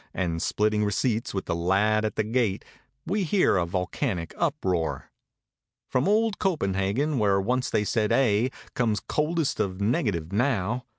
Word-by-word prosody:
And 85 -3 -1
splitting 105 0 +1
receipts 110 +3 0
with 95 - -3
the - - -1
lad 100 +6 +2
at 110 - -2
the 110 - +1
gate. 110 -3 0 0.4
We 200 +3 0
hear 185 - +3
a 85 -2 0
volcanic 90 - -2
uproar. 80 -9 -1 0.8
From 130 +2 +1
old 215 0 +2
Copenhagen, 130 - 0
where 100 -2 +3
once 125 +6 0
they 105 - +1
said 105 0 0
"aye," 120 -1 +3 0.2
Comes 110 -4 +1
coldest 155 0 -1
of 95 -1 -1
negative 100 -6 0
now. 120 0 0
105 Hz, 150 wpm, -26 LUFS, 95-130 Hz, 0.8 s, hear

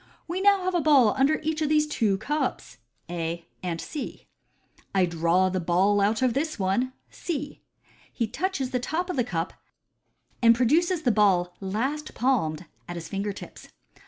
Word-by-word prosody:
" - - -38
We 355 +3 -2
now 400 -1 +4
have 370 0 -1
a 350 - +2
ball 275 -8 +5
under 275 +4 +3
each 315 0 -1
of 305 - +1
these 305 0 +4
two 220 -10 +1
cups" 275 - -3 0.3
(A 170 0 -4 0.2
and 170 -2 -3
C) 295 - -6 0.7
"I 190 -2 +4
draw 170 +2 +2
the 185 0 -1
ball 185 +4 +2
out 215 +4 +2
of 250 -2 +3
this 310 +5 -1
one" 220 +7 0 0.2
(C). 295 -4 -5 0.5
He 235 - -1
touches 275 - -2
the 250 - 0
top 345 +8 -2
of - - -4
the 250 - +2
cup, 170 -7 -3 0.9
and 230 -1 +7
produces 315 +8 +2
thx* 245 - +3
ball 185 -4 +3
last 260 +11 -3
palmed 185 - 0 0.2
at 175 - -6
his 165 -1 -7
finger 200 +1 -2
tips. 200 - -11
240 Hz, 175 wpm, -26 LUFS, 185-300 Hz, 0.9 s, and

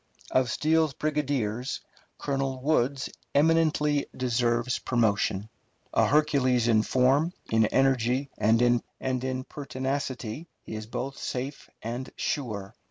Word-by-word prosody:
Of 130 -1 +3
Steele's 155 +1 +2
brigadiers, 135 -6 -1 0.4
Colonel 135 -2 -2
Woods 135 -1 +1 0.3
eminently 150 -1 +3
deserves 120 -1 +1
promotion. 105 -4 +1 0.5
A - - +4
Hercules 135 -5 +3
in 110 -2 +5
form, 135 +9 +2 0.2
in 110 -1 +4
energy, 130 +1 +2
and 110 +2 +4 0.6
in 130 0 -2
pertinacity, 130 0 -4 0.2
he - - -8
is 110 0 -6
both 135 +4 -4
safe 130 +3 -4
and 120 +4 -4
sure. 110 -8 -3
130 Hz, 105 wpm, -27 LUFS, 120-145 Hz, 0.6 s, in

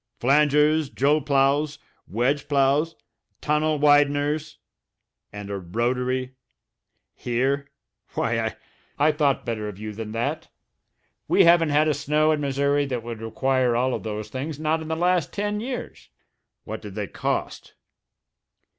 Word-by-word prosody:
Flangers, 150 +2 +3
jull 145 +3 +2
ploughs, 140 +1 +1 0.3
wedge 130 +8 0
ploughs 145 +3 +2 0.4
tunnel 150 +1 +1
wideners 145 +1 +2 0.8
and 105 -1 -7
a 100 - -3
rotary? 125 +7 -1 0.8
Here? 135 +4 -1 0.5
Why - - 0
I - - -2 0.4
I 150 +2 +4
thought 145 -3 +1
better 110 -2 -3
of 105 -3 -7
you 105 +1 -6
than 110 0 -6
that. 115 +1 -2 0.8
We - - +5
haven't 170 -2 +5
had 150 +2 +3
a 155 - +3
snow 150 +2 +1
in 150 -1 0
Missouri 140 +1 +1
that 125 -4 -3
would 115 -2 -7
require 125 +2 +1
all 130 +2 +1
of - - -3
those 105 -1 -5
things, 135 +5 -5
not 155 +1 0
in 160 - -7
the 160 - -1
last 175 -2 +1
ten 205 +1 -2
years. 250 +3 -6 0.5
What - - -6
did - - -9
they - - -2
cost?" - - -4
140 Hz, 140 wpm, -24 LUFS, 125-150 Hz, 0.8 s, We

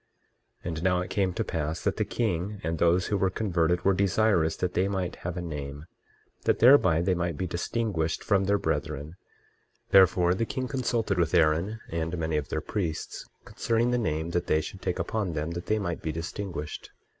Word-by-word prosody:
23:16 - - -3
And 80 0 -4
now 90 -1 +3
it 90 +1 -6
came 95 -2 +1
to 115 - -2
pass 80 -3 -3
that 100 - 0
the 110 - +2
king 105 -2 -2
and 80 +1 -2
those 85 +2 +3
who 105 - 0
were 95 0 +2
converted 90 -4 0
were 100 - +5
desirous 95 -3 +2
that 90 -1 -1
they 95 +2 +2
might 95 -3 -2
have 90 0 -5
a 90 - -3
name, 75 -2 -6 0.6
that - - +3
thereby 115 - +6
they 95 +1 +2
might 85 -3 -2
be 95 - -2
distinguished 85 -2 -2
from 100 -2 +2
their 100 +1 +3
brethren; 75 -2 -3 0.8
therefore 90 -2 +6
the 95 - -1
king 130 +3 -3
consulted 120 -7 -1
with 85 -2 +1
Aaron 85 +8 +2
and 85 +1 -2
many 80 -1 -1
of 75 - -3
their - - -2
priests, 85 -7 -4 0.2
concerning 115 +1 0
the 125 - +2
name 80 -4 -1
that 90 0 -1
they 80 - +3
should 95 +4 -7
take 90 - -2
upon 95 +1 -2
them, 75 +2 -2
that 85 +1 -6
they 110 - +2
might 85 -5 -3
be 80 - -2
distinguished. 85 0 -5
90 Hz, 200 wpm, -27 LUFS, 80-100 Hz, 0.8 s, thereby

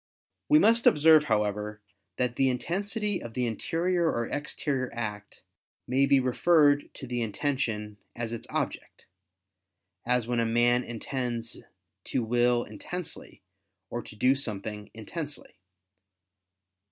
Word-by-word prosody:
We 300 - +7
must 230 -5 +5
observe, 155 0 +6
however, 105 -2 -1 0.4
that 125 -1 0
the 135 -1 +3
intensity 200 - -1
of 115 -1 -8
the 125 -1 0
interior 170 +9 0
or 120 0 -2
exterior 145 -3 -2
act, 105 -3 -6 0.4
may 135 +2 +3
be 140 -1 +5
referred 145 +3 +3
to 135 - -7
the 120 -1 -2
intention 110 -2 -2 0.2
as 115 -1 -3
its 115 - -6
object: - - -4 1.0
as 125 -1 +2
when 120 0 -1
a - - +3
man 120 +2 +3
intends 120 -1 -4 0.4
to 125 - -1
will 120 +1 +2
intensely, 175 - -8 0.5
or 120 - -3
to 110 - -12
do 125 +5 +4
something 105 -5 -4
intensely. 145 +2 -7
125 Hz, 125 wpm, -28 LUFS, 115-145 Hz, 1.0 s, We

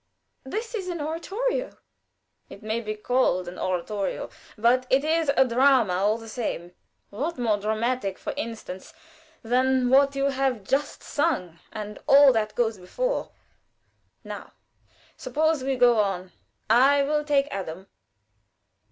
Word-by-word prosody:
But 265 - -11
this 450 +2 -3
is 395 -5 -4
an 345 -2 -4
oratorio." 395 +12 -3 0.7
"It - - -12
may 220 +2 -2
be 215 -1 -4
called 210 -5 +1
an 175 - -8
oratorio, 190 +2 -2 0.3
but 245 +3 +3
it 265 +2 +3
is 320 0 +1
a 265 - +6
drama 250 -4 +4
all 205 +4 +1
the 225 -1 -11
same. 195 -6 -4 0.4
What 290 +12 -3
more 225 -4 +1
dramatic, 220 -1 -1
for - - -5
instance, 225 - -7 0.5
than 255 +2 +2
what 275 +1 +5
you 275 0 +1
have 265 -5 -1
just 275 +8 -1
sung, 250 - -1
and 210 -1 -7
all 275 -1 +7
that 215 -2 -1
goes 225 -4 0
before? - - -2 0.9
Now - - -8 0.6
suppose 315 -2 0
we 270 0 0
go 245 -2 +4
on. 190 -3 -1 0.4
I 270 +5 +5
will 300 +1 0
take 285 -1 +2
Adam." 190 -1 -5
250 Hz, 140 wpm, -25 LUFS, 210-280 Hz, 0.9 s, all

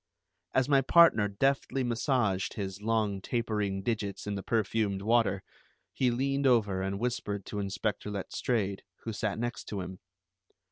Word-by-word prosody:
As 130 -1 +3
my 140 -2 +5
partner 135 -8 +6
deftly 135 +5 0
massaged 120 -5 0
his 100 -1 -4
long 105 -3 0
tapering 105 -4 -1
digits 100 -3 -2
in 105 - -2
the 100 - -3
perfumed 105 -2 0
water, 110 -4 +2 0.5
he 130 - +2
leaned 135 +3 +1
over 105 -7 +3
and 95 +1 -2
whispered 105 -4 -2
to 105 - -4
Inspector 100 +1 -2
Letstrayed, 100 0 -2 0.2
who 115 - -4
sat 105 -1 -2
next 120 +1 -3
to 100 -2 -4
him. 90 +1 -7
105 Hz, 145 wpm, -30 LUFS, 100-120 Hz, 0.5 s, partner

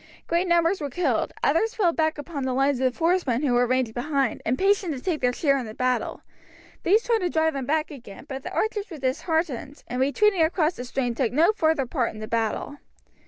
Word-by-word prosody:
Great 345 +2 0
numbers 345 +1 +2
were 290 - -2
killed, 275 -5 0
others 440 +10 +2
fell 360 -6 +2
back 315 -1 0
upon 290 0 -6
the 260 -1 -1
lines 270 0 +2
of 255 -1 0
horsemen 325 -7 +1
who 265 -4 +2
were 245 0 +3
ranged 255 -2 0
behind, 270 0 -1
impatient 380 - +2
to - - -6
take 325 +2 -2
their 250 -1 +3
share 275 +1 +1
in 245 - -5
the 215 - -9
battle; 255 0 -1 0.6
these 425 +6 +3
tried 465 -2 +1
to 360 -3 -1
drive 320 -1 +1
them 270 -2 -4
back 310 +1 0
again, 245 -7 -11
but 270 -2 -6
the - - -7
archers 425 -1 -1
were 330 - -8
disheartened, 290 0 -2
and 250 +1 -2
retreating 370 +7 +3
across 320 0 +2
the 250 - -7
stream 245 -1 -1
took 235 -1 0
no 320 - +4
further 315 -8 +1
part 245 -4 -2
in - - -9
the 215 - -6
battle. 230 +5 -2
285 Hz, 215 wpm, -25 LUFS, 255-340 Hz, 0.6 s, no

